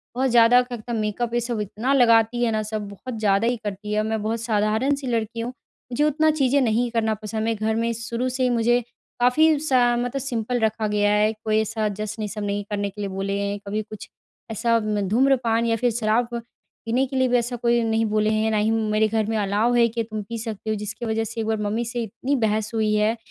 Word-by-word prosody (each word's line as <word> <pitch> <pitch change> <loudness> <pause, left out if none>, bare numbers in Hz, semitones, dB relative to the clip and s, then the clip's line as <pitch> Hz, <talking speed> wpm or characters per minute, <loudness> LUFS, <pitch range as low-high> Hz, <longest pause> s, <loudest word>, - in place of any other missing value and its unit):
बहुत 260 +1 +1
ज़्यादा 240 +1 +6
क्या 245 -1 -6
कहता 235 +2 -7
मेकअप 225 +2 -2
ये 240 - +2
सब 235 -1 -3
इतना 215 +5 -2
लगाती 235 -2 +4
है 235 - +2
ना 215 -1 0
सब 215 -1 -4
बहुत 225 +4 -7
ज़्यादा 205 +1 +2
ही 245 0 +1
करती 205 0 -5
है। 215 0 +1
मैं 220 0 -2
बहुत 225 +1 -2
साधारण-सी 225 +5 0
लड़की 230 -1 -2
हूँ 230 +1 -2 0.4
मुझे 245 +5 +1
उतना 305 +1 +3
चीज़ें 280 -2 +2
नहीं 240 0 +1
करना 225 -2 +1
पसंद। 215 +1 -4
मे 225 +1 +1
घर 220 +1 -1
में 230 +1 0
शुरू 235 +2 -3
से 255 +1 -2
ही 250 - +3
मुझे 240 0 +3 0.4
काफ़ी 300 +5 +4
सा 255 -5 +3
मतलब 245 +3 -2
सिंपल 245 -2 -2
रखा 220 -1 0
गया 205 0 +2
है 210 +1 +3
कोई 215 0 +2
ऐसा 220 0 -1
जश्न 215 +1 -4
ये 210 - -2
सब 210 +1 -5
नहीं 205 0 -2
करने 205 -1 -2
के 205 +1 -9
लिए 200 - -3
बोले 195 +1 -3
हैं। 200 0 -2
कभी 210 +2 -1
कुछ, 215 0 -10 0.4
ऐसा 230 +1 +1
म 210 -1 -1
धूम्रपान 235 -1 +2
या 230 -1 +2
फ़िर 245 +2 +1
शराब 225 +1 +1 0.6
पीने 245 +4 +1
के 265 - -7
लिए 260 0 +3
भी 245 0 +3
ऐसा 240 +1 -2
कोई 235 0 +1
नहीं 225 0 +1
बोले 215 0 +1
हैं 220 +1 +1
ना 215 - +1
ही 210 +1 +2
मेरे 220 -1 +1
घर 220 0 0
में 225 - 0
अलाउ 210 +3 +1
है 240 -1 +5
कि 230 0 -2
तुम 215 -1 -5
पी 230 +3 -6
सकते 220 -1 -5
हो। 215 - +1
जिसकी 210 +3 -5
वजह 225 0 0
से 225 +1 -6
एक 220 - -3
बार 220 0 0
मम्मी 215 +3 -1
से 240 +1 -3
इतनी 235 +6 -2
बहस 215 0 -1
हुई 215 -1 +1
है 210 +2 +2
225 Hz, 240 wpm, -23 LUFS, 215-240 Hz, 0.6 s, ज़्यादा